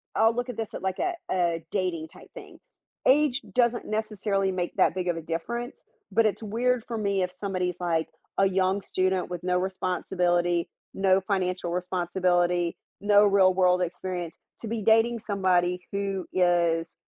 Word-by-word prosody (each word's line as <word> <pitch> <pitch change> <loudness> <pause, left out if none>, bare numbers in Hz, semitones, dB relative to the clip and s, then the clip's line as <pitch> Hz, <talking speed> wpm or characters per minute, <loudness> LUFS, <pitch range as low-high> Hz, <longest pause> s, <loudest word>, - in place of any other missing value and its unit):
I'll 225 +1 +4
look 245 +1 -2
at 245 - -5
this 225 -2 -4
at - - -6
like 190 -1 -2
a 365 - 0 0.2
a 170 -3 0
dating 180 -5 -1
type - - -15
thing. - - -12 0.5
Age 275 -1 +4
doesn't 240 -1 +2
necessarily 210 -2 -1
make 180 -1 -3
that - - +3
big 180 -1 -2
of 170 - 0
a - - -4
difference, 235 - -5 0.3
but 225 +3 +3
it's 215 +1 0
weird 240 +3 0
for 230 - -3
me 200 -3 0
if 180 - -3
somebody 185 -3 -2
is, 180 - -6
like, 165 -2 0 0.3
a 195 - +4
young 190 +1 +1
student 185 -1 -1
with 175 -1 -6
no 180 0 +1
responsibility, 175 -2 0 0.2
no 195 0 +3
financial 185 -3 -1
responsibility, 175 -1 0 0.3
no 205 0 +5
real-world 185 -2 +4
experience 175 -1 -4 0.2
to 225 - -6
be 225 0 -3
dating 225 +2 +3
somebody 180 -4 +1
who 195 -2 -2
is 170 -2 +2
185 Hz, 165 wpm, -26 LUFS, 175-210 Hz, 0.5 s, no